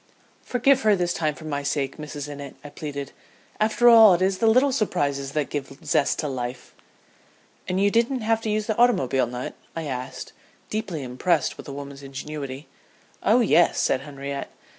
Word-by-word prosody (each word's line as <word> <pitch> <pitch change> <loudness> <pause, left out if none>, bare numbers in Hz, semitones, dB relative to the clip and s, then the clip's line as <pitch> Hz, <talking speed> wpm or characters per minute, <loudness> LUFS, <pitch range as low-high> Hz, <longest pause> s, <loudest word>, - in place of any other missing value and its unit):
"'Forgive 265 +2 +2
her 215 -3 +4
this 175 -2 0
time 155 -2 -1
for 150 - -11
my 145 -2 -2
sake, 140 -1 -2
Mrs. 150 -1 -6
Innitt,' 140 -2 -8
I 145 - -8
pleaded. 140 -2 -6 0.5
'After 220 +3 +3
all 225 -5 +9
it 175 - -3
is 190 0 +1
the 225 - +3
little 255 +5 +4
surprises 140 - -1
that 150 -2 -1
give 135 -2 -5
zest 140 - +2
to 150 - -2
life.'" 125 -2 -5 0.9
"And 185 +1 0
you 200 +1 +3
didn't 235 +3 +1
have 225 0 +1
to 225 - -3
use 215 0 0
the 220 - -1
automobile 135 - +3
nut?" 125 +1 -5 0.2
I 165 - -3
asked, 130 -3 -6 0.4
deeply 200 -9 -3
impressed 135 +5 0
with - - -11
the 140 - -6
woman's 140 0 -8
ingenuity. 140 0 -7 0.5
"Oh - - +4
yes," - - +4
said 130 - +1
Henriette. 140 0 -6
150 Hz, 180 wpm, -24 LUFS, 140-215 Hz, 0.9 s, all